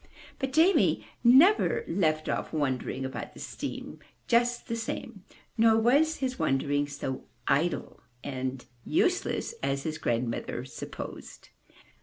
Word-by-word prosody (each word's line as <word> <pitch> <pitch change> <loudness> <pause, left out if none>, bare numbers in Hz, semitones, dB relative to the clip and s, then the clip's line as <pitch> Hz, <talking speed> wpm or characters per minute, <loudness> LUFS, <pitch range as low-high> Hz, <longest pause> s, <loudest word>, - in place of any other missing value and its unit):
But 265 -1 -2
Jamie 330 +7 +4 0.2
never 320 - +5
left 155 -4 +1
off - - -2
wondering 135 -3 -1
about 130 - -6
the - - -11
steam - - -6 0.3
just 240 0 +2
the 230 - -2
same, 230 -1 -5 0.4
nor 225 0 +6
was 285 +8 +4
his 260 -3 -3
wondering 145 +1 +1
so 140 -2 -5 0.2
idle 160 +5 0 0.2
and 130 -2 -4 0.2
useless 365 +5 0
as 135 0 -1
his 155 0 -3
grandmother 120 -3 -2
supposed. - - -8
175 Hz, 120 wpm, -28 LUFS, -, 0.4 s, nor